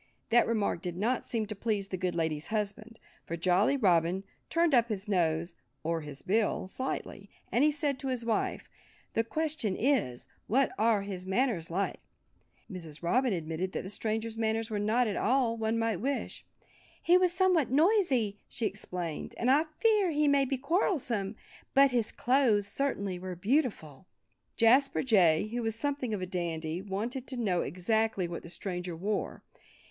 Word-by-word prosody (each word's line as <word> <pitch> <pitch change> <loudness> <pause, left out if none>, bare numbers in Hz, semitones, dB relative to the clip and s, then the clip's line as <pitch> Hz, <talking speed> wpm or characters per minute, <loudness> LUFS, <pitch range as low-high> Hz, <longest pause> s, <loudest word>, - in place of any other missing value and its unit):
That 240 +1 +5
remark 210 -6 0
did 175 -2 -5
not 235 +6 0
seem 225 -2 -1
to 215 +1 -6
please 200 -2 -2
the - - -2
good 180 -1 -2
lady's 160 -2 -1
husband. 215 +1 -4 0.3
For 170 - -3
Jolly 185 +10 +3
Robin 180 -4 +2 0.3
turned 335 -2 +2
up 235 -2 +4
his 205 -1 -3
nose—or 165 - -1
his 145 -2 -8
bill—slightly, 215 +4 -2 0.2
and 245 - +3
he 305 - +5
said 290 -2 -1
to 270 - -4
his 250 -3 -1
wife, 225 -2 -1 0.5
"The 225 - +2
question 290 -5 -1
is: 225 - 0 0.2
What 265 +4 +2
are 220 -2 +3
his 190 -2 -6
manners 195 -5 0
like?" 190 +4 -2 0.7
Mrs. 170 -6 -8
Robin 250 +8 +2
admitted 170 +1 -3
that - - -3
the 190 - -5
stranger's 220 +1 -3
manners 225 0 0
were 210 - -1
not 220 +4 +2
all 250 0 +2
that 225 - -9
one 220 +1 +1
might 225 -3 0
wish. 275 +3 -3 0.6
"He 350 - +5
was 365 -1 +4
somewhat 360 -5 +2
noisy," 270 - +2
she 230 - -4
explained. 180 -5 -4
"And 245 +2 +2
I 300 +4 +4
fear 425 -5 +3
he 300 -1 +2
may 280 -1 +4
be 270 0 -1
quarrelsome. 255 - 0 0.4
But 275 0 +6
his 235 -3 0
clothes 245 -5 +2
certainly 200 -6 -2
were 185 0 -5
beautiful." 190 - -1 0.5
Jasper 255 +5 +4
Jay, 195 -6 +4
who 240 +2 -2
was 225 -1 -1
something 275 -1 -2
of 200 -3 -2
a - - -1
dandy, 170 -2 -3
wanted 225 +7 -4
to 260 - -3
know 195 -7 +1
exactly 200 +3 0
what 170 0 -6
the 170 - -11
stranger 180 -1 -5
wore. 200 +4 -3
220 Hz, 165 wpm, -30 LUFS, 185-260 Hz, 0.7 s, But